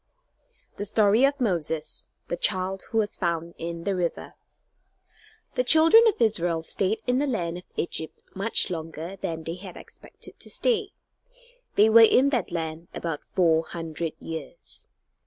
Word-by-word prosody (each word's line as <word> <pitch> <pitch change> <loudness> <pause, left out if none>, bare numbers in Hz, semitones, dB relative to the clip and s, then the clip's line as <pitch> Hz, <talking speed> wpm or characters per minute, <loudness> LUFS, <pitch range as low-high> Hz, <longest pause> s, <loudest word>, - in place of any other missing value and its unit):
THE 205 - -4
STORY 215 +4 +4
OF 280 +1 0
MOSES, 165 - -1 0.2
THE - - -2
CHILD 190 +1 0
WHO 225 - -2
WAS 210 -2 0
FOUND 170 -2 -2
IN 170 0 -5
THE 200 0 -1
RIVER 175 -2 -3 1.2
The - - +1
children 330 +6 +6
of 435 - +1
Israel 175 -8 +1
stayed 195 +5 -1
in 250 +1 +1
the 290 - 0
land 175 -9 -2
of - - -15
Egypt 160 -1 -3
much 200 0 +4
longer 165 +2 -6
than 165 -3 -4
they 165 - -4
had 185 -1 -10
expected - - -13
to - - -7
stay. 440 -4 +1 0.9
They 210 - +6
were 225 +1 +7
in 255 +5 +5
that 245 -8 -1
land 165 0 -4
about 165 -3 -4
four 165 -3 +2
hundred 165 -1 -5
years. 165 - -8
185 Hz, 155 wpm, -25 LUFS, 165-225 Hz, 1.2 s, were